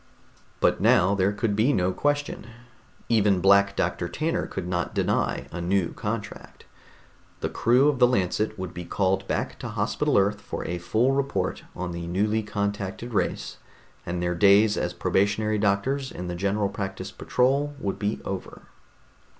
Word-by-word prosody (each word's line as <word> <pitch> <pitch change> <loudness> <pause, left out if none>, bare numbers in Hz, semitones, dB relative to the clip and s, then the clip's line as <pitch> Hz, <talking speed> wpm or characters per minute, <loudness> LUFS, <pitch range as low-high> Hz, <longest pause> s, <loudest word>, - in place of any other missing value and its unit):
But - - +2
now 95 +3 +4
there 100 0 +2
could 105 0 -1
be 110 +7 +3
no 95 -7 +1
question. 145 0 -1 0.6
Even 105 -4 +3
Black 100 +1 +4
Doctor - - -1
Tanner 165 +3 -1
could 95 -2 -5
not 90 -1 -2
deny - - 0
a 85 - -5
new 90 0 0
contract. 105 0 -6 0.8
The - - -1
crew 125 +5 +3
of 145 -4 +1
the 125 - +7
Lancet 110 -1 0
would 95 -2 -5
be 90 - -6
called 95 +2 0
back - - -2
to - - -5
Hospital - - 0
Earth 100 +1 +2
for - - -6
a 90 +1 -3
full 110 +9 +1
report 140 0 -1
on 90 0 -4
the 85 0 -5
newly 105 +5 +1
contacted 105 +2 -3
race, 95 -4 -1 0.5
and 90 0 -3
their 90 0 0
days 100 +4 +5
as - - -2
probationary 105 +2 +1
doctors 120 +7 0
in 90 - -6
the 90 - -4
General 100 +2 0
Practice 95 -1 -5
patrol 140 +6 0
would 100 -5 -3
be 105 0 -1
over. 95 -1 -6
100 Hz, 160 wpm, -25 LUFS, 95-110 Hz, 0.8 s, the